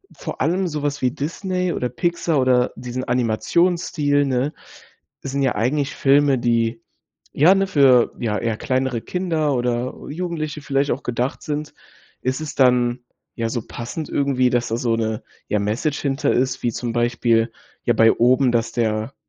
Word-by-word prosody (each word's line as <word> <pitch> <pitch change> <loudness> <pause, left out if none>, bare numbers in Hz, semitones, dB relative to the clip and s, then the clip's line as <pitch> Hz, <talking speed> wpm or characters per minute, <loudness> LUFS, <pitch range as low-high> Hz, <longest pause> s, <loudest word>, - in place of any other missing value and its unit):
vor - - -7
allem 185 +3 +1
sowas 145 -2 -3
wie 125 - +2
Disney 180 +5 -2
oder 125 - -2
Pixar 170 +3 0
oder 125 -1 +3
diesen 125 +1 -5
Animationsstil, 145 +5 +1
ne? 135 +2 0 0.7
Sind 140 0 -2
ja 130 -2 +1
eigentlich 135 +6 0
Filme, 140 -1 +3
die, 115 -1 0 0.5
ja, 160 +7 +6
ne, 195 0 +1
für, 135 -8 +4
ja, 105 -3 -1
eher 115 -2 -1
kleinere 130 -2 -1
Kinder 165 -4 -1
oder 125 0 -1 0.2
Jugendliche 155 -2 -4
vielleicht 140 0 0
auch 130 - -3
gedacht 125 +2 -2
sind. 150 0 -4 0.5
Ist 130 +4 -2
es 150 -3 -6
dann, 125 -2 +3 0.4
ja, 115 -1 -2
so 120 0 -2
passend 130 +6 -6
irgendwie, 135 -3 +1
dass 120 -1 0
da 115 - -1
so 120 -1 0
'ne, 110 -1 -2 0.3
ja, 105 - 0
Message 110 +9 -1
hinter 135 0 0
ist, 130 +1 0
wie 120 - +1
zum 120 +1 -4
Beispiel, 120 -1 +1 0.3
ja, - - +2
bei 115 0 +5
Oben, 125 +2 +3
dass 115 -1 0
der 110 +1 -1
130 Hz, 160 wpm, -21 LUFS, 120-145 Hz, 0.7 s, ja